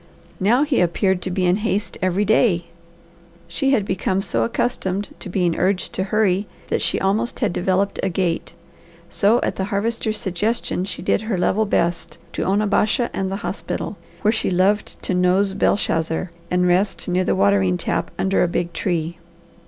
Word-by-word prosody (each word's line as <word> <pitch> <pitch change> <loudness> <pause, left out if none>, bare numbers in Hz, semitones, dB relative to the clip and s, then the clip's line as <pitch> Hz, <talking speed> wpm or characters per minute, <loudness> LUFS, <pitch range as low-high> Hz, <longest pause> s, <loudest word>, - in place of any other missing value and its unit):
Now 235 +8 +3
he 290 -7 +1
appeared 180 +2 +1
to 185 - -3
be 185 0 0
in 180 +2 +3
haste 210 -1 -2
every 185 +3 +1
day. 200 -5 +3 0.8
She 170 +11 -1
had 225 -7 +2
become 190 0 0
so 115 - 0
accustomed 195 - -1
to - - -7
being 175 -2 +1
urged 185 0 0
to 190 - -1
hurry 205 -1 +1 0.2
that - - 0
she - - 0
almost 215 +5 0
had 210 -7 +1
developed 190 +2 0
a 195 - 0
gait; 175 -2 -1 0.6
so 215 +4 +3
at - - -2
the 190 - -1
Harvester's 215 +2 -1
suggestion 200 0 -1
she 195 - -6
did - - +1
her 220 -3 -2
level 210 +4 +1
best 170 -3 -1 0.2
to - - -2
Onabasha 210 +4 +1
and 190 0 -2
the - - -1
hospital, - - -4 0.3
where 210 - +4
she 225 - +1
loved 190 +3 +1
to - - -1
nose 185 +2 +2
Belshazzar 165 -3 0 0.2
and 180 0 +2
rest 185 +3 +1
near 180 +1 +1
the - - +1
watering 95 -2 +3
tap - - -1
under 190 0 +1
a - - +3
big 170 0 -2
tree. 170 -1 -2
190 Hz, 175 wpm, -21 LUFS, 180-210 Hz, 0.8 s, where